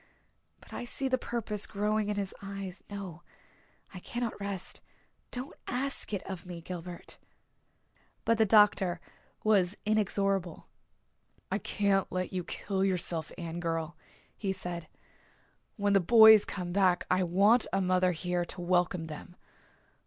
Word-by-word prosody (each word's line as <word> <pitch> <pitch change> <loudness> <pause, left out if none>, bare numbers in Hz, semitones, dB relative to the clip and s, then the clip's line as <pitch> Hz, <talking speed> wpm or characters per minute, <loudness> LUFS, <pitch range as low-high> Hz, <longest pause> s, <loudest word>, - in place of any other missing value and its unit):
But - - -16
I - - -4
see 265 +3 -2
the 255 -1 +1
purpose 220 -4 -2
growing 210 +1 0
in 210 - 0
his 200 -2 -3
eyes. 195 -2 -6
No, 195 -5 -7 0.7
I 180 - -7
cannot 235 +4 -4
rest 200 -2 -4 0.5
don't 250 +2 -6
ask 270 0 -3
it 200 -3 -2
of 190 -3 -6
me, 180 -2 -7
Gilbert." 175 0 -8 1.1
But 230 -1 +2
the 220 - +6
doctor 195 -4 +5 0.4
was 200 -3 +3
inexorable. 195 -4 0 0.9
"I - - +1
can't 200 -2 +1
let 185 0 -2
you 180 -1 -2
kill 190 +2 -2
yourself, 175 -4 0
Anne 170 0 -5
girl," 165 -1 -2 0.4
he 195 -3 -2
said. 175 -3 -5 0.9
"When 205 -1 +1
the 195 - +6
boys 220 +2 +8
come 180 -2 -5
back 185 -2 +3
I 185 +1 +3
want 200 +7 +4
a 195 - +1
mother 185 -1 +2
here 180 +1 -1
to 175 - -7
welcome 175 -1 +1
them. 160 +2 -9
190 Hz, 140 wpm, -30 LUFS, 175-210 Hz, 1.1 s, boys